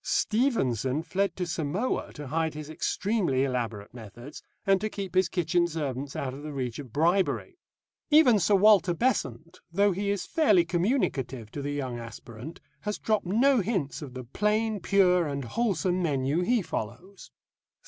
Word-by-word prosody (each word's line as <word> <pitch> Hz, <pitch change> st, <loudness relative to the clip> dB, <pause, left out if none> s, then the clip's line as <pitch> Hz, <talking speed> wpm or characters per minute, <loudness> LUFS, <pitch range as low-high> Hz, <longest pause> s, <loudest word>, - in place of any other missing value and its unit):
Stevenson 155 Hz, -, +1 dB
fled 195 Hz, 0 st, -1 dB
to 180 Hz, -, -2 dB
Samoa 170 Hz, -, -2 dB
to 150 Hz, -, -8 dB
hide 160 Hz, +1 st, -1 dB
his 155 Hz, 0 st, -7 dB
extremely 175 Hz, -, 0 dB
elaborate 115 Hz, -6 st, -3 dB
methods, 120 Hz, +4 st, -10 dB, 0.2 s
and 195 Hz, -1 st, +3 dB
to 215 Hz, -, -1 dB
keep 195 Hz, -4 st, -6 dB
his 185 Hz, -1 st, +3 dB
kitchen 175 Hz, 0 st, +1 dB
servants 140 Hz, -4 st, -4 dB
out 130 Hz, -2 st, -3 dB
of 140 Hz, -, -9 dB
the 150 Hz, 0 st, -6 dB
reach 130 Hz, -4 st, -4 dB
of 135 Hz, -5 st, -9 dB
bribery. 170 Hz, -, +1 dB, 0.5 s
Even 295 Hz, -8 st, +6 dB
Sir 200 Hz, +3 st, +3 dB
Walter 190 Hz, -3 st, +5 dB
Besant, 170 Hz, -, -1 dB
though 200 Hz, +3 st, +3 dB
he 200 Hz, +2 st, -2 dB
is 200 Hz, -1 st, -1 dB
fairly 210 Hz, -, +3 dB
communicative 155 Hz, -, -1 dB
to 145 Hz, -, -5 dB
the 145 Hz, +1 st, -3 dB
young 130 Hz, -4 st, -3 dB
aspirant, 115 Hz, +5 st, -9 dB, 0.2 s
has 210 Hz, 0 st, -3 dB
dropped 215 Hz, -4 st, 0 dB
no 250 Hz, +7 st, +4 dB
hints 185 Hz, -10 st, -2 dB
of 135 Hz, -4 st, -8 dB
the 130 Hz, -, -6 dB
plain, 210 Hz, -, 0 dB
pure, 180 Hz, -2 st, +3 dB
and 140 Hz, -2 st, -4 dB
wholesome 185 Hz, -, 0 dB
menu 145 Hz, 0 st, 0 dB
he 230 Hz, +3 st, +1 dB
follows. 145 Hz, -, -6 dB
170 Hz, 160 wpm, -27 LUFS, 135-200 Hz, 0.5 s, Even